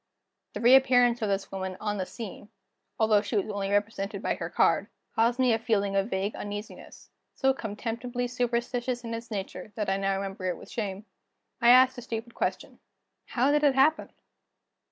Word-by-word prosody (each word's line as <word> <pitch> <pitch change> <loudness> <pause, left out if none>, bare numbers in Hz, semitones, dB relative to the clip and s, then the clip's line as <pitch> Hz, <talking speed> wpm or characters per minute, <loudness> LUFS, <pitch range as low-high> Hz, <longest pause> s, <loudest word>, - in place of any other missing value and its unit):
The - - -5
reappearance 245 -1 +5
of 215 - 0
this 195 0 -2
woman 190 -1 -4
on 210 -1 -2
the 185 - -2
scene 215 -2 -8 0.5
although 220 -2 +4
she 215 +2 -4
was 200 - 0
only 200 -1 -2
represented 205 0 -1
by - - +1
her - - -5
card - - +2 0.3
caused 230 +2 +2
me 255 -3 +3
a 225 - +1
feeling 205 -3 0
of 195 +2 +1
vague 195 +1 -1
uneasiness, 205 +1 -8 0.2
so 265 -1 +2
contemptibly 235 +2 -4
superstitious 245 0 -2
in 230 -1 -5
its 230 +1 -6
nature 195 -1 -6
that 210 -3 -2
I 195 - +1
now 195 0 0
remember 195 -1 -5
it 180 -2 -1
with - - -13
shame. 205 -2 -4 0.6
I 235 - +6
asked 255 +1 +6
a - - -7
stupid 230 0 -6
question: - - -3 0.5
"How 260 +3 +2
did 295 0 +2
it 280 -3 +4
happen?" 295 +4 +3
225 Hz, 180 wpm, -28 LUFS, 200-245 Hz, 0.6 s, I